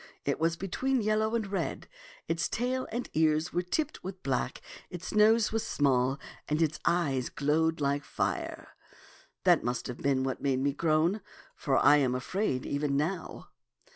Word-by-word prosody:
It - - 0
was 165 +1 +2
between 250 +7 -1
yellow 215 +1 +1
and 225 -2 0
red, 195 0 -3 0.4
its 165 0 0
tail 255 +2 -1
and 240 +2 -3
ears 155 +1 +2
were 175 - +1
tipped 295 - -2
with 190 0 -7
black, 130 -1 -1 0.3
its 180 0 -6
nose 215 +1 +5
was 225 0 0
small, 135 -2 +1 0.3
and 150 +1 +1
its 155 -2 +1
eyes 140 -8 +1
glowed 160 +3 +1
like 140 0 0
fire. - - -3 0.7
That - - +5
must 120 +1 -2
have 125 - -6
been 135 -2 +1
what 130 -1 -2
made 135 -2 +1
me 140 +1 +1
groan, 165 +6 +1 0.3
for 135 -2 0
I 145 - +6
am 130 -3 +2
afraid 130 0 -1
even 140 -1 0
now.' 165 +4 -3
160 Hz, 165 wpm, -30 LUFS, 140-200 Hz, 0.7 s, I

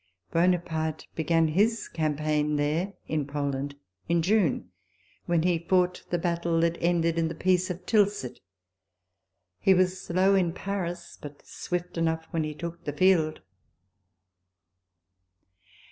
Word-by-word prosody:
Buonaparte 165 -3 0
began 165 0 +2
his 215 +8 +1
campaign 150 -1 0
there 155 +7 0
[in 150 -3 -1
Poland] 140 -1 -3 0.3
in 170 -1 +2
June, 195 -4 +1 0.6
when 170 -2 +2
he 175 -2 +2
fought 180 +1 +1
the 175 - +1
battle 170 -1 0
that 170 0 +1
ended 170 -1 +2
in 165 - +1
the 160 - -5
Peace 185 0 +1
of 180 0 -6
Tilsit. 205 - +2
J - - -29 1.2
He 195 - +5
was 185 0 +1
slow 185 +3 +2
in 180 -4 +2
Paris, 175 -3 -5
but 145 -1 -10
swift 175 -1 -4
enough 160 -1 0
when 165 -1 0
he 155 -1 -4
took 170 +2 -7
the 145 - -3
field. 165 -2 +3
170 Hz, 130 wpm, -27 LUFS, 155-180 Hz, 1.2 s, He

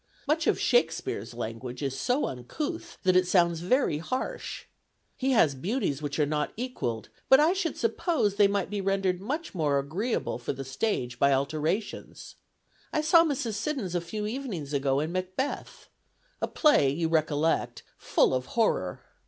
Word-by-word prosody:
Much 315 +3 +1
of - - +2
Shakespeare's 160 - 0
language 120 +3 -5
is 135 -1 -2
so 250 - +1
uncouth 300 - -5
that 185 -1 +3
it 185 0 +4
sounds 170 -3 +3
very 180 - +1
harsh. 255 +10 -4 0.5
He 265 0 0
has 165 - +4
beauties 155 - -2
which 145 -1 -3
are 150 - +3
not 150 0 -1
equalled; 170 - -3 0.2
but 265 - +8
I 315 +4 +4
should 360 -5 -2
suppose 230 - +1
they 200 0 +5
might 200 -1 -1
be 205 -1 -2
rendered 195 -2 0
much 295 +11 -4
more 150 -6 +1
agreeable 165 - -2
for 120 - -3
the 135 0 -6
stage 130 - -2
by 140 - +4
alterations. 155 +9 -2 0.6
I 305 - +1
saw 330 +2 +6
Mrs. 270 -8 -1
Siddons 220 - -2
a 175 - 0
few 210 +5 -4
evenings 210 - -4
ago 135 -1 +1
in 155 +3 -2
'Macbeth,' 185 +9 -4 0.5
a - - +1
play, 295 - +4
you 160 +4 0
recollect, 160 -1 0 0.2
full - - +2
of 130 0 -1
horror. 95 - +1
180 Hz, 160 wpm, -28 LUFS, -, 0.6 s, but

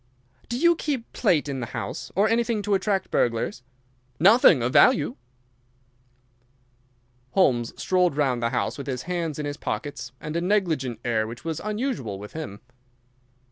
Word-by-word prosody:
"Do 240 - -2
you 340 +5 +4
keep 280 -7 -4
plate 175 - +2
in 135 -2 -3
the 120 - -4
house, - - -5
or 200 +3 +4
anything 230 -1 +1
to 205 0 0
attract 195 0 0
burglars?" 115 +1 0 0.6
"Nothing 185 - +6
of 125 +3 -1
value." 150 -1 +5 2.2
Holmes 125 -11 +2
strolled 180 -5 +2
round 130 -5 +1
the 115 - +1
house - - -2
with 140 - -6
his 130 -2 -3
hands 170 -4 -3
in 150 - -3
his 145 0 -4
pockets 145 -4 -5
and 155 +1 -6
a 170 - 0
negligent 160 - 0
air 110 -2 +1
which 120 +5 -9
was 160 -1 -2
unusual 215 - -3
with 105 +1 -10
him. 105 -10 -7
155 Hz, 155 wpm, -25 LUFS, 125-205 Hz, 2.2 s, Nothing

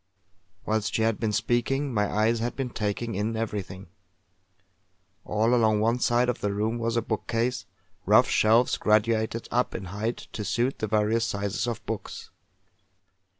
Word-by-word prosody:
Whilst 110 -1 0
she 110 - +2
had 115 -1 +1
been 110 -2 0
speaking, 130 +5 0
my 105 -2 0
eyes 110 +2 +2
had 120 +2 -2
been 130 -3 -3
taking 110 +2 -2
in 105 +3 -2
everything. 100 -4 -4 1.4
All 110 +3 +1
along 110 -3 +3
one 115 +3 +1
side 120 +1 +2
of 125 - -2
the 105 - 0
room 110 +3 -1
was 115 0 -1
a 115 - +1
bookcase, 115 +3 -2 0.4
rough - - +6
shelves 115 +3 +3
graduated 110 +1 +1
up 125 +1 0
in 95 - -5
height 110 +4 -3
to 105 - -4
suit 120 +5 -1
the 110 - -1
various 110 +2 +1
sizes 100 +3 -2
of 120 -2 -4
books. - - -6
115 Hz, 155 wpm, -26 LUFS, 105-120 Hz, 1.4 s, rough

